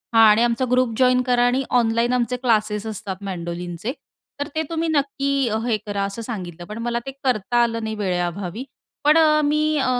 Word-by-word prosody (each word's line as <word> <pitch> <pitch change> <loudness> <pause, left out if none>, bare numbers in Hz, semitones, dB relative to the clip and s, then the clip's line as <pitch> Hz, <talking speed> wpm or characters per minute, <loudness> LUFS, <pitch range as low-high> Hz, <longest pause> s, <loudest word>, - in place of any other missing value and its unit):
हां 225 - +8
आणि 210 +2 +5
आमचा 240 +2 +1
ग्रुप 250 -2 +2
जॉइन 255 -1 +4
करा 245 -1 +2
आणि 255 +2 +1 0.2
ऑनलाईन 230 +1 +1
आमचे 250 0 0
क्लासेस 215 -3 0
असतात 205 -2 -6
मेंडोलिनचे. 175 +3 -4 0.5
तर 285 - -2
ते 315 - 0
तुम्ही 330 0 -1
नक्की 280 -2 0 0.3
हे 230 -3 +1
करा, 200 -1 -2
असं 200 +4 -4
सांगितलं. 180 -7 -6
पण 210 - -6
मला 235 0 -1
ते 270 - -4
करता 240 -1 +1
आलं 230 -1 -1
नाही 220 0 -3
वेळेअभावी. 180 +3 -3 0.4
पण 300 +2 +5
अ, 305 -1 +5
मी 305 +1 +1
अ, 265 - +1
235 Hz, 185 wpm, -22 LUFS, 205-260 Hz, 0.5 s, हां